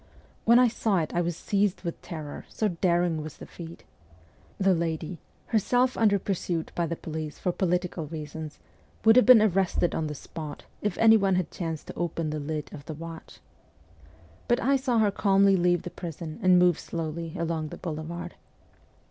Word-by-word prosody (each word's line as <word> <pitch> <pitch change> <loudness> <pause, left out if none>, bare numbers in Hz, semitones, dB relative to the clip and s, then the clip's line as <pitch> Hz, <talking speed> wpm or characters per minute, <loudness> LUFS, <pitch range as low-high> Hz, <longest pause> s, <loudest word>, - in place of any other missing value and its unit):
When 235 +1 +7
I 250 0 +6
saw 220 -3 0
it 160 -3 -1
I 175 - +2
was 170 -1 -2
seized 200 -2 0
with 170 -2 -5
terror, 155 -4 -7
so 215 - 0
daring 170 -2 +1
was 155 0 -8
the - - -9
feat. 170 -1 -10 0.7
The 195 -1 +3
lady, 165 0 -2 0.3
herself 245 +4 +2
under 210 -3 +4
pursuit 180 -4 -2
by 170 -1 -1
the 170 - -2
police 155 -2 -6
for 180 - -1
political 180 -3 -1
reasons, 155 0 -7 0.5
would 225 0 +8
have 250 - +6
been 245 -4 +9
arrested 190 -3 +1
on 160 - -1
the 150 - -5
spot, 150 +1 -8 0.2
if 210 -3 -1
any 225 0 +7
one 195 -2 +2
had 180 -2 -1
chanced 165 -3 -4
to - - -8
open 165 -2 -2
the 155 - -3
lid 150 0 -4
of 140 - -9
the 155 - -6
watch. 165 +1 -10 1.1
But 240 +1 +3
I 275 +2 +3
saw 260 -3 +1
her 215 -2 +4
calmly 195 -1 +4
leave 175 -1 +2
the 180 - -6
prison 165 -1 -7
and 185 -2 +5
move 180 -2 +4
slowly 165 0 -5
along 165 -2 -2
the - - -8
boulevard. 165 0 -5
175 Hz, 180 wpm, -27 LUFS, 160-195 Hz, 1.1 s, been